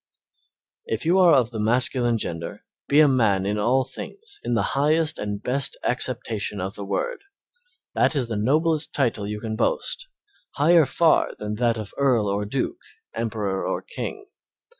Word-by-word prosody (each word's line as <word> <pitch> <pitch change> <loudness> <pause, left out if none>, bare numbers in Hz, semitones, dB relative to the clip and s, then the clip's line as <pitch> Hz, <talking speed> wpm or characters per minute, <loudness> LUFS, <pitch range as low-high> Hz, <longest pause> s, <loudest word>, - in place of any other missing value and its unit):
If 110 +4 -3
you 175 +3 +4
are 175 -4 +7
of 125 -3 +2
the 110 - -5
masculine 120 +1 +2
gender 85 0 -5 0.2
be 145 +2 +5
a 155 - +7
man 110 -8 +2
in 105 +1 -1
all 125 +5 +2
things 405 - -9
in 120 - 0
the - - +2
highest 155 +3 +2
and 105 -1 -4
best 135 +2 -1
acceptation 115 -5 -2
of 95 +2 -3
the 100 - -6
word. 485 - -2 0.7
That - - +2
is 130 -4 +1
the 115 - -3
noblest 155 +8 +1
title 115 -7 0
you 105 0 -4
can 110 0 -4
boast, - - -1 0.5
higher 160 +2 +5
far 160 +3 +2
than 105 0 -4
that 120 -1 +1
of 110 -2 -7
earl 125 -7 +2
or 100 +1 -1
duke, 100 - -3 0.3
emperor 105 -4 -2
or - - -2
king. 410 -4 -6
120 Hz, 165 wpm, -24 LUFS, 105-145 Hz, 0.7 s, are